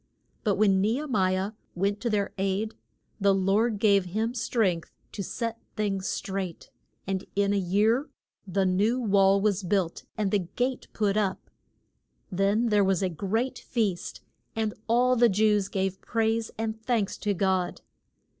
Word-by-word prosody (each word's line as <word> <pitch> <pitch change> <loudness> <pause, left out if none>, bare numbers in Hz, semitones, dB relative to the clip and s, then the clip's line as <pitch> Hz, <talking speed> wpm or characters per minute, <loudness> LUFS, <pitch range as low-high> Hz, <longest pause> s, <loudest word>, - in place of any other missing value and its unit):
But 205 -3 +2
when 195 -2 +3
Ne 215 +3 +2
he 280 +5 -2
mi 190 -8 +1
ah 195 +2 -2 0.2
went 200 +3 0
to 240 - 0
their 205 -2 0
aid 195 +3 -1 0.5
the 200 -1 +4
Lord 205 +4 +2
gave 200 -2 +4
him 220 +6 -1
strength 225 -8 0 0.2
to 205 - -5
set 230 +4 -4
things 195 -3 -1
straight, 190 -3 -4 0.3
and 190 -1 -2
in 200 0 +2
a - - +2
year 210 - +2 0.4
the 190 +1 +1
new 205 +7 +2
wall 200 -3 +4
was 200 -1 +1
built 185 -2 -1
and 205 -3 0
the 205 - +3
gate 245 +9 -2
put 205 -1 +1
up. 200 -3 -1 0.8
Then 200 +5 +2
there 210 -1 +4
was 195 -1 +1
a 185 - +1
great 205 - -2
feast, 210 -7 -2 0.3
and 220 -1 -1
all 250 +2 +4
the 240 -1 +5
Jews 210 0 +2
gave 190 -1 -2
praise 225 0 0
and 220 0 -3
thanks 225 -5 0
to 205 -1 0
God. 185 -1 0
200 Hz, 160 wpm, -27 LUFS, 190-225 Hz, 0.8 s, the